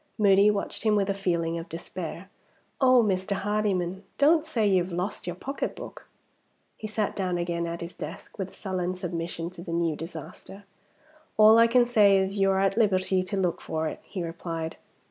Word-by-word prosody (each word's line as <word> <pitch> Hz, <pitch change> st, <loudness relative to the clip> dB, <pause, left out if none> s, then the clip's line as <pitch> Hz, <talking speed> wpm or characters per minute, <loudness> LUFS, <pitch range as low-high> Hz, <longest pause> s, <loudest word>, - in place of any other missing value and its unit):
Moody 200 Hz, -1 st, +5 dB
watched 205 Hz, -1 st, -2 dB
him 215 Hz, -1 st, +3 dB
with 200 Hz, -1 st, +1 dB
a -, -, 0 dB
feeling 170 Hz, -4 st, -1 dB
of 165 Hz, -, -9 dB
despair. 170 Hz, +2 st, -7 dB, 0.5 s
"Oh! 255 Hz, -2 st, +6 dB
Mr. 190 Hz, -1 st, 0 dB
Hardyman, 195 Hz, -2 st, -1 dB
don't 305 Hz, +2 st, +5 dB
say 255 Hz, -9 st, 0 dB
you 190 Hz, -2 st, +4 dB
have 180 Hz, +1 st, -5 dB
lost 180 Hz, +2 st, -3 dB
your 175 Hz, -, -3 dB
pocketbook!" 275 Hz, +10 st, -6 dB, 0.7 s
He 215 Hz, -, -6 dB
sat 215 Hz, -1 st, -2 dB
down 185 Hz, -3 st, -1 dB
again 170 Hz, -1 st, -2 dB
at 170 Hz, 0 st, -5 dB
his 170 Hz, +1 st, -6 dB
desk, -, -, -9 dB
with 190 Hz, -1 st, -4 dB
sullen 185 Hz, -2 st, -3 dB
submission 170 Hz, -1 st, -4 dB
to 180 Hz, -, -11 dB
the 170 Hz, -, -7 dB
new 170 Hz, -2 st, 0 dB
disaster. 165 Hz, +5 st, -9 dB, 0.7 s
"All 215 Hz, +1 st, +8 dB
I 230 Hz, -, +7 dB
can 240 Hz, +1 st, +4 dB
say 210 Hz, -5 st, +5 dB
is 195 Hz, +1 st, -1 dB
you're 195 Hz, 0 st, +3 dB
at 195 Hz, +1 st, +1 dB
liberty 190 Hz, -4 st, +2 dB
to 185 Hz, +2 st, -4 dB
look 180 Hz, -3 st, 0 dB
for 160 Hz, 0 st, -2 dB
it," -, -, -5 dB
he 185 Hz, -4 st, -6 dB
replied. 165 Hz, -1 st, -5 dB
190 Hz, 185 wpm, -27 LUFS, 170-210 Hz, 0.7 s, All